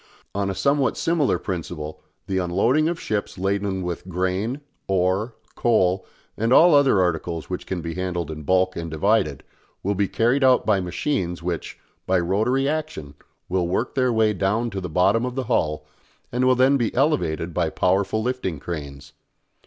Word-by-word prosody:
On 100 0 -1
a 95 - -3
somewhat 140 +8 +1
similar 165 -4 +1
principle 80 -4 -5 0.2
the 95 -1 -1
unloading 115 - +2
of 170 -1 -3
ships 105 -2 -3
laden 95 0 -1
with 90 +1 -5
grain, 95 - -2 0.3
ore, 95 +5 0 0.2
coal, 95 -5 +1 0.3
and 115 +2 -1
all 165 +5 +7
other 140 -8 +5
articles 85 -1 -1
which 90 - -4
can 90 -2 -3
be 85 0 -4
handled 90 -3 -3
in 75 0 -7
bulk 95 +4 +2
and 85 -1 -4
divided, 80 -1 +1 0.4
will 100 - +1
be 100 0 0
carried 120 +8 +1
out 130 -1 +4
by 105 -3 +3
machines 90 -1 -2
which, 85 -2 -4 0.3
by 95 0 +3
rotary 110 +10 +1
action, 140 - -3 0.3
will 90 -1 0
work 105 +8 -1
their 130 -2 +2
way 110 -2 +3
down 105 +5 0
to 95 -1 -4
the 90 - -5
bottom 90 +8 +3
of 125 0 -3
the 135 - -1
hull 80 -11 0 0.5
and 125 +1 +1
will 130 0 +5
then 130 +2 +4
be 120 -4 0
elevated 90 - 0
by 85 -1 0
powerful 95 +6 +1
lifting 120 - -2
cranes. 70 -3 -7
95 Hz, 170 wpm, -23 LUFS, 90-120 Hz, 0.5 s, all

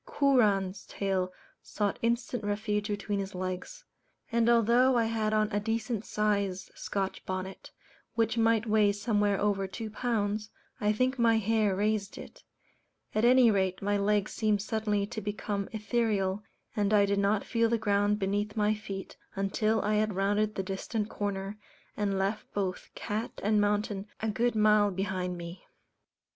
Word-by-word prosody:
Kooran's 215 - +2
tail 190 -2 -1 0.3
sought 205 -2 -2
instant 235 0 -1
refuge 210 0 -1
between 205 -1 -2
his 195 -1 -5
legs; 185 - -5 0.5
and 235 0 +3
although 240 +2 +4
I 230 - +3
had 220 -1 0
on 215 0 +1
a 205 - +1
decent 225 0 -2
sized 200 -3 -1
Scotch 195 -1 -3
bonnet, 185 0 -5 0.5
which 225 0 +1
might 225 -1 +3
weigh 210 -2 +3
somewhere 205 -1 +1
over 200 -2 +1
two 215 +3 -6
pounds, 215 -2 -1 0.3
I 210 0 +2
think 255 +4 0
my 230 -1 +4
hair 215 -2 +2
raised 210 0 -1
it; - - -11 0.7
at 215 - +1
any 250 -1 +6
rate 190 -1 0
my 205 +1 +1
legs 205 0 +1
seemed 210 -2 +1
suddenly 215 -2 0
to 220 +1 -6
become 205 -1 -3
ethereal, 210 -3 0 0.3
and 210 0 +2
I 200 -1 +5
did 200 0 +1
not 200 +1 +2
feel 230 -1 +1
the 235 - +2
ground 205 -1 +2
beneath 205 +2 -1
my 210 0 +3
feet 200 -3 -7 0.2
until 215 +3 +1
I 210 0 +1
had 215 -2 0
rounded 205 +2 +1
the 195 - -2
distant 205 +3 -3
corner, 200 0 -4 0.4
and 200 -2 0
left 195 +3 -2
both 190 -3 -2
cat 215 +2 -4
and 210 +1 +3
mountain 205 -1 0
a 220 - -1
good 235 +3 0
mile 210 -1 +4
behind 185 -2 -2
me. 170 +1 -8
210 Hz, 155 wpm, -29 LUFS, 200-220 Hz, 0.7 s, any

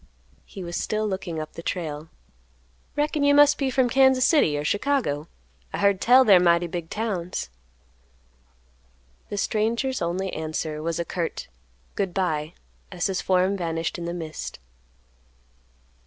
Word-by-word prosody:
He 190 - -9
was 175 0 -5
still 215 0 -1
looking 185 -5 -4
up 155 0 -6
the - - -8
trail. 160 -3 -4 0.9
"Reckon 295 0 0
you 285 0 +5
must 290 0 +6
be 275 -2 +1
from 260 -1 +2
Kansas 265 0 +4
City 165 - +3
or 145 - -2
Chicago? 205 - 0 0.4
I - - -4
heard 200 -1 +2
tell 255 +2 +6
they're 195 -5 +7
mighty 170 0 +3
big 170 -1 -5
towns." 180 - -3 1.8
The 205 - -4
stranger's 230 +6 0
only 185 +3 -2
answer 155 -1 -3
was 165 +1 -2
a 170 - -2
curt 170 -1 -4 0.4
"Good 190 -3 -2
by," 160 -4 -1 0.4
as 180 -2 -2
his 195 -2 0
form 185 +1 +2
vanished 165 -2 -3
in 170 - -5
the 170 - -3
mist. 160 -3 -6
185 Hz, 145 wpm, -25 LUFS, 165-225 Hz, 1.8 s, they're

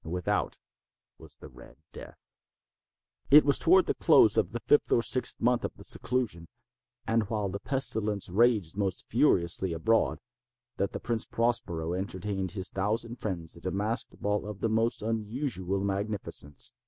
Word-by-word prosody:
Without 90 +2 -2 0.6
was - - -11
the - - -12
"Red 60 0 -16 0.2
Death." - - -12 1.0
It 145 +2 +8
was 140 - +3
toward 370 +1 +5
the - - 0
close - - +5
of - - +2
the - - -4
fifth 440 - +3
or 115 - +3
sixth 130 - 0
month 125 +1 +2
of - - -4
his - - -3
seclusion, 115 -10 -1 0.6
and 115 -2 0
while 105 -3 -1
the 100 +2 -5
pestilence 110 -5 -1
raged 105 -3 +2
most 95 -3 -2
furiously 85 +1 +2
abroad, 110 +8 +1 0.6
that 100 - -1
the - - -4
Prince 115 -2 -2
Prospero 90 -8 -1
entertained 95 0 -3
his 95 -2 -4
thousand 110 +5 -2
friends 85 -8 -5
at 85 +2 -8
a - - -1
masked 105 +4 -3
ball 105 0 -1
of 105 -2 -8
the 115 - +1
most 115 +1 0
unusual 110 -3 -2
magnificence. 100 -7 -3
105 Hz, 155 wpm, -29 LUFS, 95-115 Hz, 1.0 s, It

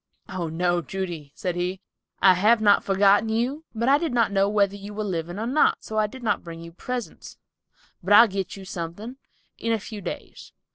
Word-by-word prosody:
"Oh, 185 -3 -4
no, 175 +2 0
Judy," 170 -3 -5
said 180 -5 -3
he, 180 +1 -2 0.4
"I 190 -1 +8
have 215 +6 +4
not 205 -2 +4
forgotten 200 +2 +4
one 220 - -1
of - - +2
you, 275 +7 -2
but 230 +2 -1
I 280 +2 +5
did 325 -6 -2
not 230 -4 +2
know 195 0 +2
whether 200 -1 +2
you 205 +1 -9
were 215 - -2
living 175 -2 -3
or 220 - -3
not, 275 +6 +2
so 215 0 -2
I 215 - +2
did 255 +4 -11
not 225 - 0
bring 165 -1 -8
you 170 - -10
presents, 245 +7 -6 0.6
but 190 - -4
I'll 230 +3 +9
get 195 -2 -4
you 195 - -10
something, 185 +8 -6 0.4
in 230 - -1
a 225 - +1
few 210 +1 -8
days. - - -8
200 Hz, 220 wpm, -24 LUFS, 180-225 Hz, 0.6 s, I'll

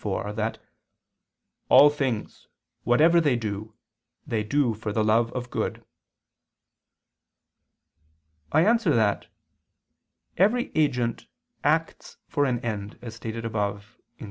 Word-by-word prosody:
iv) 105 +1 -3
that 110 +1 -2 1.1
"all 145 +1 +8
things, 130 -7 -4 0.4
whatever 160 +8 +4
they 145 -6 +2
do, 110 -1 -5 0.5
they 115 -6 -1
do 130 +1 +1
for 110 0 -5
the 110 +1 0
love 115 +2 +2
of 125 -1 -5
good." - - -3 2.7
I 155 +3 +4
answer 225 - +3
that, 110 -3 +1 1.1
Every 225 +7 +2
agent 125 -7 0 0.4
acts - - -1
for 145 - 0
an 125 -3 -1
end, 105 -3 -5
as 115 -2 -7
stated 115 0 -6
above 105 -1 -4 0.2
(Q. - - -41
115 Hz, 115 wpm, -25 LUFS, 110-145 Hz, 2.7 s, all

